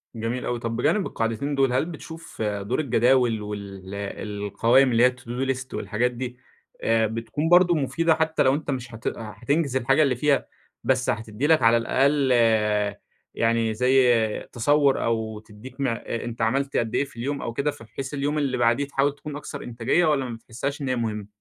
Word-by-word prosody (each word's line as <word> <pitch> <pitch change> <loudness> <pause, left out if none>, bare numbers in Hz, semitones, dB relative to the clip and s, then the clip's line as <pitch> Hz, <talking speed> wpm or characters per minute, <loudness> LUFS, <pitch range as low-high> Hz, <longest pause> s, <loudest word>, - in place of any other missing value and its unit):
جميل 115 +3 -3
أوي. 120 -1 -2
طب، 115 0 -3
بجانب 190 - +1
القاعدتين 115 +6 -2
دول، 135 -2 +2
هل 130 - +2
بتشوف 165 -2 -9
دور 105 +3 -1
الجداول 125 -4 +2
وال 100 -2 -7
القوايم 105 +5 +1
اللي 120 +1 +4
هي 125 - +6
To-Do 125 +2 -4
List 130 0 -9
والحاجات 110 +5 -1
دي 125 0 -6 0.5
آآ، 115 -1 +3
بتكون 115 +8 -3
برضو 175 0 +6
مفيدة؟ 160 +3 +1
حتى 160 0 +1
لو 130 - +4
أنت 150 -1 -3
مش 125 -3 -5
هتأ 110 - -3
هتنجز 125 +7 -2
الحاجة 135 +4 +3
اللي 135 -3 +2
فيها، 140 +3 +1 0.4
بس 130 -1 +1
هتدّي 110 +5 -2
لك 160 -3 +4
على 115 0 +5
الأقل 135 +3 +2 1.0
يعني 115 -1 +1
زيّ 120 -2 +3
تصور، 140 +3 +2
أو 110 -2 -1
تديك 110 +5 -13
م 135 - +1
أنت 115 0 -4
عملت 135 +5 0
قدّ 115 -1 -1
إيه - - +2
في 115 - -17
اليوم 140 +5 -3
أو 115 - -4
كده، 140 +5 0
فبحيث 135 +3 -8
اليوم 145 +2 -1
اللي 135 -4 0
بعديه 120 +4 +2
تحاول 140 0 0
تكون 145 0 -8
أكثر 145 0 -7
إنتاجية، 120 +8 +1
والّا 145 -4 +2
ما 120 -2 -5
بتحسّهاش 125 +6 -5
إن 135 - -2
هي 130 - +1
مهمّة؟ 105 -4 -3
125 Hz, 180 wpm, -24 LUFS, 115-140 Hz, 1.0 s, هي